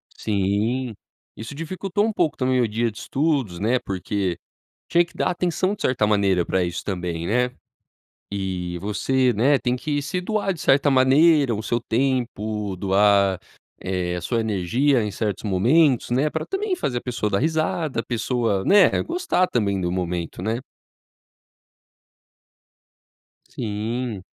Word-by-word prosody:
Sim. 110 Hz, +5 st, -1 dB, 0.4 s
Isso 115 Hz, +6 st, -8 dB
dificultou 185 Hz, +6 st, -2 dB
um 225 Hz, -, 0 dB
pouco 170 Hz, -5 st, 0 dB
também 130 Hz, -1 st, +1 dB
o 115 Hz, -, +2 dB
dia 115 Hz, +2 st, -1 dB
de 105 Hz, -, -11 dB
estudos, 135 Hz, -, -1 dB
né, 120 Hz, +5 st, +1 dB
porque 95 Hz, -3 st, -3 dB, 0.5 s
tinha 175 Hz, 0 st, +4 dB
que -, -, -22 dB
dar -, -, 0 dB
atenção, 180 Hz, +3 st, 0 dB
de -, -, -16 dB
certa 120 Hz, -5 st, +2 dB
maneira 100 Hz, -4 st, +2 dB
pra 95 Hz, -1 st, +1 dB
isso 85 Hz, 0 st, -4 dB
também, 85 Hz, -3 st, -3 dB
né? 125 Hz, +3 st, +1 dB, 0.8 s
E 90 Hz, -3 st, -3 dB
você, 125 Hz, +5 st, +1 dB
né, 135 Hz, +6 st, +3 dB
tem 125 Hz, 0 st, -1 dB
que 145 Hz, +2 st, -2 dB
se 180 Hz, +5 st, -2 dB
doar 205 Hz, 0 st, -1 dB
de 160 Hz, -, -11 dB
certa 140 Hz, +1 st, +3 dB
maneira, 135 Hz, 0 st, +4 dB
o 105 Hz, -, -4 dB
seu 120 Hz, +1 st, -1 dB
tempo 110 Hz, -5 st, -1 dB
doar, 100 Hz, 0 st, +3 dB, 0.4 s
eh, 90 Hz, -2 st, -2 dB
a -, -, -4 dB
sua 115 Hz, +4 st, 0 dB
energia 110 Hz, +6 st, +1 dB
em 105 Hz, -, -2 dB
certos 105 Hz, 0 st, -3 dB
momentos, 125 Hz, -, +3 dB
né, 140 Hz, +5 st, +2 dB
pra -, -, -3 dB
também 390 Hz, -1 st, -2 dB
fazer 125 Hz, -, -1 dB
a -, -, -11 dB
pessoa 120 Hz, -4 st, -2 dB
dar 100 Hz, -, +1 dB
risada, 155 Hz, -3 st, 0 dB
a -, -, -7 dB
pessoa, 115 Hz, -4 st, -1 dB
né, 200 Hz, -1 st, +5 dB
gostar 335 Hz, -, 0 dB
também 100 Hz, -5 st, 0 dB
do 90 Hz, -1 st, -1 dB
momento, 90 Hz, -1 st, -3 dB
né? 110 Hz, +4 st, -1 dB, 2.9 s
Sim. 115 Hz, -, -4 dB
120 Hz, 150 wpm, -23 LUFS, 100-140 Hz, 2.9 s, né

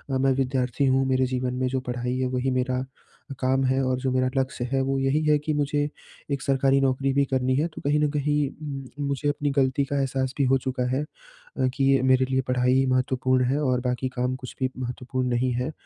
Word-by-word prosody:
अ, -, -, +3 dB
मैं 135 Hz, +1 st, +3 dB
विद्यार्थी 130 Hz, 0 st, 0 dB
हूँ, 135 Hz, 0 st, +3 dB
मेरे 130 Hz, 0 st, +2 dB
जीवन 125 Hz, 0 st, -2 dB
में 130 Hz, 0 st, -1 dB
जो 130 Hz, +1 st, -1 dB
पढ़ाई 125 Hz, +1 st, -2 dB
है, 130 Hz, 0 st, 0 dB
वही 130 Hz, +1 st, -1 dB
मेरा 130 Hz, 0 st, 0 dB, 0.5 s
काम 130 Hz, +1 st, +1 dB
है 130 Hz, +1 st, +2 dB
और 130 Hz, 0 st, +1 dB
जो 130 Hz, 0 st, -1 dB
मेरा 130 Hz, 0 st, +1 dB
लक्ष्य 130 Hz, -2 st, -1 dB
है, 135 Hz, -1 st, +2 dB
वो 135 Hz, +1 st, 0 dB
यही 135 Hz, +3 st, +1 dB
है 150 Hz, 0 st, +4 dB
कि 155 Hz, +1 st, -2 dB
मुझे 145 Hz, 0 st, 0 dB, 0.4 s
एक 140 Hz, -2 st, -1 dB
सरकारी 135 Hz, 0 st, +2 dB
नौकरी 135 Hz, 0 st, +1 dB
भी 140 Hz, +1 st, +3 dB
करनी 130 Hz, -1 st, 0 dB
है, 150 Hz, +5 st, +1 dB
तो 160 Hz, -, -10 dB
कहीं 150 Hz, +1 st, +3 dB
न 150 Hz, -, +2 dB
कहीं 145 Hz, -1 st, 0 dB, 0.5 s
म 145 Hz, -, -1 dB
मुझे 140 Hz, +1 st, 0 dB
अपनी 145 Hz, 0 st, -1 dB
गलती 135 Hz, 0 st, +2 dB
का 140 Hz, +1 st, -1 dB
एहसास 135 Hz, -1 st, -1 dB
भी 140 Hz, -, +2 dB
हो 135 Hz, +1 st, +4 dB
चुका 130 Hz, -1 st, -2 dB
है 140 Hz, -, 0 dB
अ, -, -, -6 dB
कि 140 Hz, -, 0 dB
ये 135 Hz, -, +3 dB
मेरे 130 Hz, 0 st, +4 dB
लिए 130 Hz, 0 st, +2 dB
पढ़ाई 125 Hz, +1 st, +2 dB
महत्वपूर्ण 130 Hz, 0 st, +1 dB
है 135 Hz, +4 st, +1 dB
और 130 Hz, -3 st, +2 dB
बाकी 125 Hz, +1 st, -1 dB
काम 125 Hz, +1 st, 0 dB
कुछ 130 Hz, -1 st, -9 dB
भी 130 Hz, -1 st, +1 dB
महत्वपूर्ण 125 Hz, +1 st, -3 dB
नहीं 125 Hz, +1 st, +1 dB
है। 125 Hz, +5 st, -2 dB
130 Hz, 225 wpm, -25 LUFS, 130-140 Hz, 0.5 s, है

